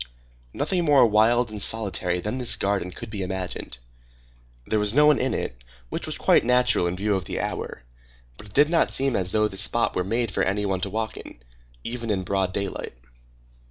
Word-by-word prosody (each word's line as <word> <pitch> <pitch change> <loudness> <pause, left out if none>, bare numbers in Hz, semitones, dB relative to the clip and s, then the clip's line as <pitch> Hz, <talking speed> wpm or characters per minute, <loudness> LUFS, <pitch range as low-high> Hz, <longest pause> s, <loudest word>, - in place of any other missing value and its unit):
Nothing 175 +5 -1
more 145 -5 +5
wild 115 +2 +3
and 105 -1 -2
solitary 95 -5 +2
than 105 +7 -4
this 125 - +4
garden 100 -2 -1
could 110 +5 -9
be 105 -2 -5
imagined. 90 -8 -5 0.9
There 110 - 0
was 105 +2 +3
no 150 +1 +6
one 150 -2 +5
in 130 - 0
it, - - -5 0.3
which - - -4
was - - -4
quite - - +3
natural 125 -7 +3
in 85 - -2
view 105 +3 -1
of 95 - -3
the - - -4
hour; - - -4 0.5
but 105 - -13
it 100 - -18
did 145 +4 +4
not 170 - +3
seem 135 -2 0
as 90 -1 -1
though 105 0 +2
this 95 -1 -1
spot 115 +1 +1
were 90 - 0
made 115 +3 -1
for - - -1
any 105 +2 0
one 95 -2 -1
to 100 - -2
walk 110 +2 -4
in, - - -11 0.5
even 115 -1 -5
in 95 -3 0
broad 95 0 -1
daylight. 100 -9 -4
105 Hz, 205 wpm, -24 LUFS, 95-120 Hz, 0.9 s, no